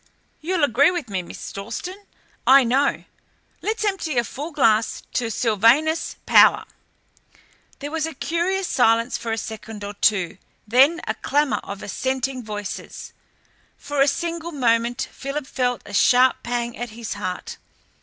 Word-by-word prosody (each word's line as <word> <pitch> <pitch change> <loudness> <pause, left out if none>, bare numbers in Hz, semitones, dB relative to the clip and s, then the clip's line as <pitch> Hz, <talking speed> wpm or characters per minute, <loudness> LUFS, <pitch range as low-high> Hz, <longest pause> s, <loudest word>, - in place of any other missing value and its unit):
You'll 340 0 -1
agree 280 +1 +4
with 345 -9 -4
me, 190 -2 -2
Miss 175 - -9
Dalstan, 360 - -7 0.4
I 270 +1 +8
know. 265 +4 +1 0.6
Let's 435 +1 -2
empty 360 -9 -1
a 240 - +4
full 285 +6 -6
glass 225 -7 +2
to 240 -2 -1
Sylvanus 235 +9 +2
Power!" - - +6 1.1
There 290 +1 -6
was 325 0 -1
a 320 - -8
curious 355 +6 -1
silence 230 0 +2
for 230 - -4
a 225 - -1
second 220 -1 -7
or 205 0 -5
two, 195 -3 +1 0.3
then 270 +9 +4
a 220 - 0
clamour 285 +5 0
of 200 0 -8
assenting 260 +3 -2
voices. 210 -3 -7 0.6
For 285 -1 -2
a 275 - +5
single 335 +3 -2
moment 240 -2 +1
Philip 275 +1 -5
felt 250 -3 -1
a 205 - -10
sharp 250 +5 +4
pang 235 0 -3
at 240 +1 -5
his 225 0 -6
heart. 185 -3 -5
255 Hz, 145 wpm, -22 LUFS, 225-300 Hz, 1.1 s, I